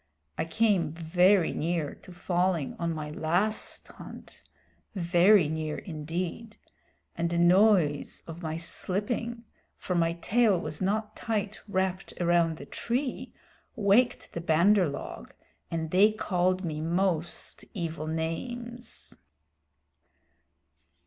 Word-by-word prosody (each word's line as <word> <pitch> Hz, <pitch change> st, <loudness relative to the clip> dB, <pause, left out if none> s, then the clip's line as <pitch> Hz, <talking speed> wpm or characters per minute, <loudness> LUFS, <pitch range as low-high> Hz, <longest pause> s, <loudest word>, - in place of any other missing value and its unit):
I -, -, -1 dB
came 180 Hz, -3 st, +1 dB
very 175 Hz, +3 st, +3 dB
near 165 Hz, -2 st, -1 dB
to 185 Hz, -, -15 dB
falling 175 Hz, -4 st, 0 dB
on 170 Hz, 0 st, 0 dB
my 155 Hz, -2 st, -4 dB
last 175 Hz, +8 st, -1 dB
hunt -, -, -12 dB, 0.5 s
very 175 Hz, 0 st, +5 dB
near 155 Hz, 0 st, -3 dB
indeed 175 Hz, +7 st, -5 dB, 0.6 s
and 170 Hz, 0 st, -1 dB
the 170 Hz, -, -1 dB
noise 175 Hz, -4 st, +3 dB
of 165 Hz, +1 st, -8 dB
my 160 Hz, -1 st, -3 dB
slipping, 225 Hz, +7 st, -3 dB, 0.3 s
for 180 Hz, -, -3 dB
my 165 Hz, -1 st, +2 dB
tail 205 Hz, +3 st, +2 dB
was 155 Hz, -2 st, -5 dB
not 210 Hz, +3 st, -1 dB
tight 215 Hz, -2 st, -3 dB
wrapped 190 Hz, -1 st, -2 dB
around 170 Hz, -2 st, +2 dB
the 140 Hz, -, -9 dB
tree, 250 Hz, -, -3 dB, 0.4 s
waked 215 Hz, +4 st, +2 dB
the 170 Hz, -, -4 dB
Bandar 175 Hz, +3 st, +4 dB
log, 140 Hz, -, -8 dB, 0.3 s
and 160 Hz, -1 st, -3 dB
they 200 Hz, +4 st, +6 dB
called 185 Hz, -3 st, 0 dB
me 155 Hz, -2 st, -3 dB
most 170 Hz, 0 st, -1 dB
evil 165 Hz, -4 st, -3 dB
names." 235 Hz, +10 st, -5 dB
175 Hz, 115 wpm, -28 LUFS, 165-205 Hz, 0.6 s, they